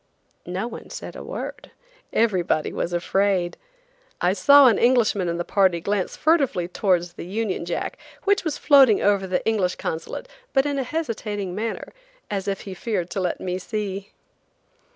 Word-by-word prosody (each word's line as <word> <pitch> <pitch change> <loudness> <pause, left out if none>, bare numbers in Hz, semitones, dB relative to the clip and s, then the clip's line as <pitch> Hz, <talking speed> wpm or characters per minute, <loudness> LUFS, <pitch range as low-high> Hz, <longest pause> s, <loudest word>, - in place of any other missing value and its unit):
No 185 +6 -2
one - - -9
said - - -8
a - - -7
word. - - -6 0.4
Everybody 185 -8 +1
was 170 - -2
afraid! 180 0 +1 0.6
I 180 +1 +2
saw 280 +8 +7
an 230 -5 +5
Englishman 230 -7 +3
in 170 - -2
the 175 - -3
party 190 -4 +3
glance 200 +1 -2
furtively 275 - +2
towards 175 -2 0
the - - -8
Union 200 -2 -2
Jack, 170 - -3 0.2
which 400 -1 +2
was 315 -4 -2
floating 270 -8 +6
over 200 -2 +2
the 185 0 -1
English 200 -5 +1
Consulate, 160 0 -5 0.3
but 270 0 +3
in 285 -1 -1
a - - 0
hesitating 220 - -3
manner, 220 +4 -4 0.4
as 195 -1 -2
if 195 -1 -2
he 195 - -7
feared 185 -2 -3
to - - -2
let 180 -2 -1
me 180 0 -3
see. 200 0 -4
200 Hz, 165 wpm, -23 LUFS, 180-230 Hz, 0.6 s, saw